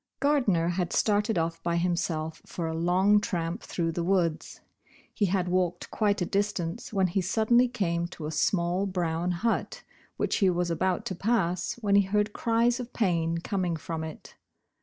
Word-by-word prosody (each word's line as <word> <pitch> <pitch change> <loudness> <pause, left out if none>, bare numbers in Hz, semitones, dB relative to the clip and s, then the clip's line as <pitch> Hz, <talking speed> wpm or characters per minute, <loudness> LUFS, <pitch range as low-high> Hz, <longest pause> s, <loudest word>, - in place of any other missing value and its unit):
GARDNER 245 - +2
had 175 -1 -1
started 210 0 +2
off 165 0 -1
by 170 0 -1
himself 170 -2 -1
for 170 - -4
a 160 - -2
long 180 +5 +3
tramp 175 -2 -2
through 165 -2 -2
the 170 +1 -2
woods. 170 -3 0 0.5
He 205 - +1
had 185 -1 0
walked 180 -1 -1
quite 205 -3 +1
a - - -1
distance 200 0 -2
when 195 -3 +2
he 185 +2 0
suddenly 225 +6 +3
came 170 -8 -1
to 170 -3 -8
a 155 - -3
small, 175 +4 +1
brown 175 -2 -1
hut, 215 +6 -1 0.3
which - - 0
he 195 - +4
was 175 -1 0
about 185 +2 0
to - - -3
pass 185 -3 0
when 200 -1 +2
he 200 - +7
heard 210 +1 +1
cries 235 +1 +1
of 245 -1 -6
pain 170 -6 +1
coming 180 -2 -1
from 160 +2 -5
it. 160 -1 -9
180 Hz, 175 wpm, -28 LUFS, 170-205 Hz, 0.5 s, he